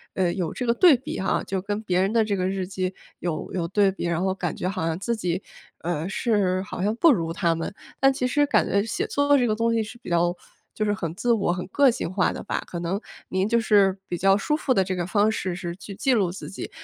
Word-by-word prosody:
呃， 180 Hz, -2 st, +1 dB
有 175 Hz, -5 st, -2 dB
这 250 Hz, -, -3 dB
个 235 Hz, -, +3 dB
对 315 Hz, -1 st, +6 dB
比 260 Hz, -, -6 dB
哈， 195 Hz, -, 0 dB
就 190 Hz, -1 st, -2 dB
跟 205 Hz, +2 st, -3 dB
别 180 Hz, -2 st, +1 dB
人 195 Hz, +2 st, +1 dB
的 225 Hz, -2 st, +3 dB
这 205 Hz, -2 st, 0 dB
个 185 Hz, 0 st, 0 dB
日 190 Hz, -1 st, -2 dB
记 185 Hz, -1 st, -3 dB, 0.3 s
有 170 Hz, -3 st, -3 dB
有 170 Hz, -3 st, -1 dB
对 195 Hz, 0 st, +3 dB
比， 185 Hz, -, -5 dB
然 170 Hz, 0 st, 0 dB
后 190 Hz, 0 st, +1 dB
感 175 Hz, -4 st, -3 dB
觉 180 Hz, -, -3 dB
好 185 Hz, -5 st, -2 dB
像 160 Hz, 0 st, -1 dB
自 235 Hz, +3 st, -1 dB
己， 180 Hz, -2 st, -2 dB, 0.4 s
呃， 170 Hz, 0 st, -2 dB
是 195 Hz, -4 st, +1 dB
好 180 Hz, -, -6 dB
像 210 Hz, +2 st, +1 dB
不 325 Hz, +5 st, +6 dB
如 165 Hz, -5 st, -1 dB
他 170 Hz, -3 st, +1 dB
们。 165 Hz, -, -4 dB, 0.3 s
但 270 Hz, 0 st, +5 dB
其 250 Hz, -, -2 dB
实 290 Hz, +3 st, +2 dB
感 -, -, +3 dB
觉 200 Hz, 0 st, +2 dB
写 225 Hz, -, -2 dB
作 285 Hz, 0 st, +3 dB
这 245 Hz, -, +2 dB
个 215 Hz, -, +1 dB
东 230 Hz, +1 st, +1 dB
西 225 Hz, -1 st, +1 dB
是 225 Hz, +3 st, -10 dB
比 -, -, -9 dB
较 175 Hz, +1 st, +2 dB, 0.4 s
就 215 Hz, -, -2 dB
是 205 Hz, -, +1 dB
很 165 Hz, -5 st, -4 dB
自 240 Hz, +4 st, 0 dB
我、 195 Hz, -5 st, +1 dB
很 180 Hz, -, -4 dB
个 275 Hz, +6 st, +4 dB
性 180 Hz, -, -4 dB
化 190 Hz, -1 st, +1 dB
的 -, -, -7 dB
吧， -, -, -2 dB
可 170 Hz, -, -5 dB
能 175 Hz, +4 st, -2 dB, 0.3 s
您 190 Hz, +2 st, 0 dB
就 235 Hz, +1 st, +3 dB
是 200 Hz, -3 st, +4 dB
比 175 Hz, -, -3 dB
较 195 Hz, +2 st, +4 dB
舒 300 Hz, +9 st, 0 dB
服 265 Hz, -4 st, +1 dB
的 190 Hz, -, +3 dB
这 185 Hz, 0 st, -3 dB
个 175 Hz, -1 st, -2 dB
方 210 Hz, +2 st, +3 dB
式 185 Hz, -4 st, -2 dB
是 175 Hz, -2 st, -5 dB
去 195 Hz, +1 st, -9 dB
记 265 Hz, +4 st, +1 dB
录 190 Hz, -5 st, +1 dB
自 160 Hz, -5 st, -8 dB
己， 190 Hz, -, -6 dB
195 Hz, 290 characters per minute, -25 LUFS, 180-220 Hz, 0.4 s, 对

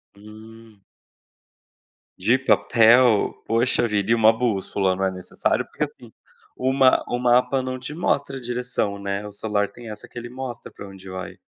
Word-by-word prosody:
Hum. 110 Hz, 0 st, -15 dB, 1.4 s
De 110 Hz, +7 st, +3 dB
papel? 120 Hz, -3 st, +4 dB
Poxa 120 Hz, +1 st, +1 dB
vida, 105 Hz, 0 st, -1 dB
e -, -, +6 dB
uma 110 Hz, 0 st, +5 dB
bússola, 100 Hz, -5 st, 0 dB
não 95 Hz, +1 st, -1 dB
é 95 Hz, -, 0 dB
necessário? 90 Hz, -1 st, -1 dB
Porque -, -, -3 dB
assim, -, -, -8 dB, 0.4 s
o 130 Hz, +1 st, 0 dB
ma 130 Hz, -1 st, +4 dB
o 120 Hz, -, -2 dB
mapa 125 Hz, +2 st, +3 dB
não 130 Hz, 0 st, -4 dB
te 130 Hz, +4 st, -7 dB
mostra 140 Hz, -4 st, -1 dB
a -, -, -8 dB
direção, 120 Hz, -4 st, -2 dB
né, 100 Hz, +1 st, -4 dB
o -, -, -9 dB
celular 100 Hz, 0 st, -1 dB
tem 115 Hz, +1 st, -10 dB
essa 105 Hz, -, -10 dB
que -, -, -14 dB
ele 120 Hz, 0 st, -6 dB
mostra 130 Hz, -1 st, -7 dB
pra 100 Hz, -, -10 dB
onde 95 Hz, 0 st, -13 dB
vai. 95 Hz, 0 st, -7 dB
115 Hz, 170 wpm, -23 LUFS, 100-125 Hz, 1.4 s, e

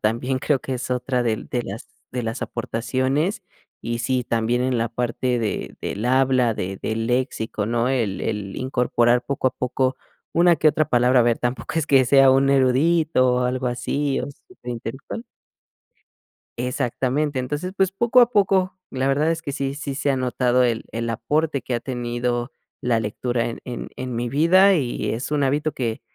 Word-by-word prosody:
también 120 Hz, +4 st, 0 dB
creo 140 Hz, +1 st, +1 dB
que 135 Hz, -, -5 dB
es 125 Hz, +1 st, -5 dB
otra 125 Hz, 0 st, 0 dB
de 110 Hz, -2 st, +1 dB
de 120 Hz, -1 st, -1 dB
las 100 Hz, +3 st, -7 dB, 0.3 s
de 125 Hz, -1 st, -2 dB
las 115 Hz, 0 st, -4 dB
aportaciones. 130 Hz, -, -1 dB, 0.4 s
Y 115 Hz, 0 st, -2 dB
sí, 125 Hz, +1 st, 0 dB
también 115 Hz, +2 st, 0 dB
en 130 Hz, -1 st, 0 dB
la 115 Hz, +1 st, 0 dB
parte 125 Hz, +1 st, -1 dB
de 110 Hz, -3 st, -3 dB
del 105 Hz, +4 st, -3 dB
habla, 130 Hz, -3 st, +3 dB
de 95 Hz, 0 st, -4 dB
del 115 Hz, +1 st, -2 dB
léxico, 120 Hz, -4 st, -1 dB
¿no?, 120 Hz, +2 st, +1 dB
el 115 Hz, -7 st, -1 dB
el 105 Hz, -3 st, -3 dB
incorporar, 125 Hz, -1 st, +2 dB
poco 135 Hz, -1 st, 0 dB
a -, -, -10 dB
poco, 130 Hz, +1 st, -1 dB, 0.4 s
una 170 Hz, 0 st, +4 dB
que 155 Hz, -, +4 dB
otra 155 Hz, 0 st, +1 dB
palabra, 125 Hz, +1 st, +4 dB
a -, -, +5 dB
ver, 115 Hz, -1 st, +2 dB
tampoco 125 Hz, +5 st, -3 dB
es 160 Hz, -2 st, +1 dB
que 135 Hz, -3 st, +5 dB
sea 135 Hz, 0 st, +6 dB
un 135 Hz, +1 st, +4 dB
erudito 135 Hz, 0 st, +3 dB
o 125 Hz, -, +1 dB
algo 125 Hz, +1 st, -1 dB
así, 135 Hz, +3 st, -1 dB
o -, -, -5 dB
sea, 130 Hz, -4 st, -10 dB
intelectual. 125 Hz, -, -6 dB, 1.3 s
Exactamente, 130 Hz, +3 st, -1 dB
entonces, 145 Hz, +9 st, -3 dB
pues, 190 Hz, -1 st, +2 dB
poco 235 Hz, +4 st, +4 dB
a 240 Hz, -, +3 dB
poco, 190 Hz, -3 st, +2 dB
la 130 Hz, 0 st, -1 dB
verdad 150 Hz, +4 st, +2 dB
es 165 Hz, -1 st, -2 dB
que 140 Hz, -, -4 dB
sí, 135 Hz, 0 st, -2 dB
sí 145 Hz, -1 st, -5 dB
se 145 Hz, 0 st, 0 dB
ha 135 Hz, -, +1 dB
notado 125 Hz, 0 st, +2 dB
el 115 Hz, -2 st, 0 dB
el 115 Hz, 0 st, -3 dB
aporte 150 Hz, +4 st, 0 dB
que 120 Hz, -, -4 dB
ha 120 Hz, -, -1 dB
tenido 120 Hz, 0 st, -2 dB, 0.3 s
la 120 Hz, -2 st, +1 dB
lectura 115 Hz, +2 st, -2 dB
en 115 Hz, -, -5 dB
en 125 Hz, -2 st, -6 dB
en 130 Hz, -2 st, -4 dB
mi 120 Hz, 0 st, -2 dB
vida 185 Hz, +7 st, +5 dB
y 130 Hz, -7 st, -1 dB
es 120 Hz, +6 st, -4 dB
un 150 Hz, -2 st, +1 dB
hábito 145 Hz, +3 st, +1 dB
que 115 Hz, -3 st, -3 dB
130 Hz, 185 wpm, -22 LUFS, 120-140 Hz, 1.3 s, sea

